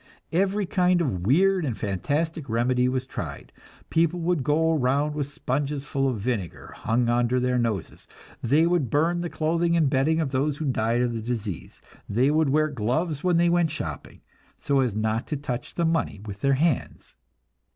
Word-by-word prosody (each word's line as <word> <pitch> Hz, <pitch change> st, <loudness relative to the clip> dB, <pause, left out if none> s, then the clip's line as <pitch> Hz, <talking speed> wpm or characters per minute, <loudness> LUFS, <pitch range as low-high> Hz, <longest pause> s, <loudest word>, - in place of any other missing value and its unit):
Every 195 Hz, +4 st, +1 dB
kind 180 Hz, 0 st, +2 dB
of 95 Hz, -, -1 dB
weird 185 Hz, +7 st, +4 dB
and 125 Hz, -7 st, -2 dB
fantastic 145 Hz, -, -2 dB
remedy 125 Hz, +2 st, +2 dB
was 130 Hz, 0 st, -2 dB
tried; -, -, -7 dB, 0.4 s
people 170 Hz, +1 st, +2 dB
would 170 Hz, -4 st, 0 dB
go 160 Hz, +4 st, +2 dB
around 145 Hz, +1 st, +1 dB
with 145 Hz, -2 st, -2 dB
sponges 140 Hz, 0 st, -2 dB
full 135 Hz, -1 st, 0 dB
of 125 Hz, -, -2 dB
vinegar 100 Hz, -6 st, -4 dB
hung 115 Hz, +1 st, 0 dB
under 120 Hz, +1 st, +2 dB
their 125 Hz, 0 st, +1 dB
noses; 110 Hz, -6 st, -3 dB, 0.3 s
they 145 Hz, +7 st, +3 dB
would 170 Hz, -7 st, +1 dB
burn 165 Hz, +6 st, +1 dB
the 175 Hz, -, -3 dB
clothing 170 Hz, +2 st, +1 dB
and 150 Hz, -5 st, +2 dB
bedding 150 Hz, +4 st, +2 dB
of 150 Hz, -5 st, -1 dB
those 140 Hz, +2 st, 0 dB
who 155 Hz, -, -3 dB
died 120 Hz, -2 st, +1 dB
of 120 Hz, -1 st, -1 dB
the 115 Hz, -, -3 dB
disease; 110 Hz, -6 st, -5 dB, 0.3 s
they 125 Hz, +7 st, +2 dB
would 155 Hz, -1 st, +2 dB
wear 155 Hz, +2 st, +3 dB
gloves 145 Hz, +5 st, -1 dB
when 180 Hz, -2 st, +3 dB
they 170 Hz, +1 st, +4 dB
went 170 Hz, -1 st, +3 dB
shopping, 80 Hz, -, -6 dB, 0.4 s
so 140 Hz, -1 st, +1 dB
as 125 Hz, -6 st, +1 dB
not 110 Hz, +2 st, -1 dB
to 150 Hz, -, -2 dB
touch 135 Hz, -3 st, -5 dB
the 170 Hz, -, +1 dB
money 165 Hz, -10 st, 0 dB
with 100 Hz, -1 st, -8 dB
their 140 Hz, 0 st, +3 dB
hands. 150 Hz, 0 st, -1 dB
140 Hz, 185 wpm, -25 LUFS, 120-160 Hz, 0.4 s, weird